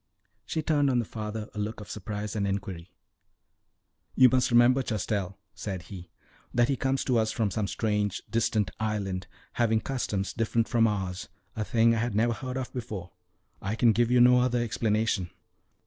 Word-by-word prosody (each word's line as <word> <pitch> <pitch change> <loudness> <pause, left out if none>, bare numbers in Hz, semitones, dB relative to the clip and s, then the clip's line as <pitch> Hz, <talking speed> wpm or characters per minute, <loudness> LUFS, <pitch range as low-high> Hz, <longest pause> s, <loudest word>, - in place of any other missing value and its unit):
She 160 - -2
turned 145 -3 +2
on 125 - +2
the 120 - +1
father 105 0 -5
a 105 - -6
look 105 +2 -3
of 105 - -9
surprise 105 +1 -5
and 100 -2 0
inquiry. 95 -3 -4 1.3
"You 130 -1 +7
must 130 0 +2
remember, 120 +2 +5
Chastel," 100 -4 -2 0.2
said 95 -4 -5
he, 90 -1 -10 0.4
"that 120 +1 +2
he 140 - +2
comes 135 +1 0
to 125 -3 +2
us 110 0 +1
from 110 -3 0
some 105 +2 -1
strange, 105 -2 -1
distant 110 -3 0
island, 100 -4 -2 0.3
having 110 -1 +3
customs 105 -7 -2
different 115 0 0
from 115 -1 +3
ours 95 -3 -3 0.3
a 110 - -1
thing 115 +1 +3
I 115 - 0
had 120 -2 -1
never 115 +2 +2
heard 130 +2 -5
of 130 -2 -5
before. 105 -8 -6 0.5
I 100 +3 -2
can 115 0 +4
give 120 +2 +2
you 125 0 +4
no 125 +1 +7
other 125 -1 +1
explanation." 110 -4 0
110 Hz, 180 wpm, -28 LUFS, 100-120 Hz, 1.3 s, You